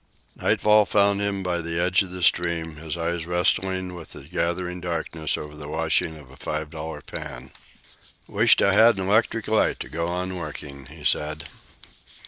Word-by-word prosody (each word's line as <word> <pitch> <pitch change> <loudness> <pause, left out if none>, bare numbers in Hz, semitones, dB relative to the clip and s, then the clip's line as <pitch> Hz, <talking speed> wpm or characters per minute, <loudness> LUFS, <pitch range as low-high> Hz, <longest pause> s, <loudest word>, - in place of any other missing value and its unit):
Nightfall 105 0 +4
found 100 -1 +3
him 100 -1 -1
by 90 -1 -1
the 85 +1 -3
edge 90 +2 +3
of 95 - -3
the 90 0 -6
stream, 85 -2 +1
his 80 +1 -5
eyes 85 0 -2
wrestling 90 +1 +1
with 85 -2 -10
the - - -8
gathering 90 +3 -2
darkness 85 -3 -2
over 75 0 -8
the 75 -1 -9
washing 80 +2 0
of 70 -4 -14
a - - -14
five 75 0 -4
dollar 80 0 -6
pan. 65 +1 -8 0.8
"Wisht - - +4
I 100 - +4
had 115 +1 +6
an 95 -1 -2
electric 110 +1 +2
light 110 0 +2
to - - -6
go 85 +1 -2
on 90 +1 -3
working," 70 -4 -7
he - - -13
said. 75 0 0
85 Hz, 175 wpm, -24 LUFS, 80-95 Hz, 0.8 s, had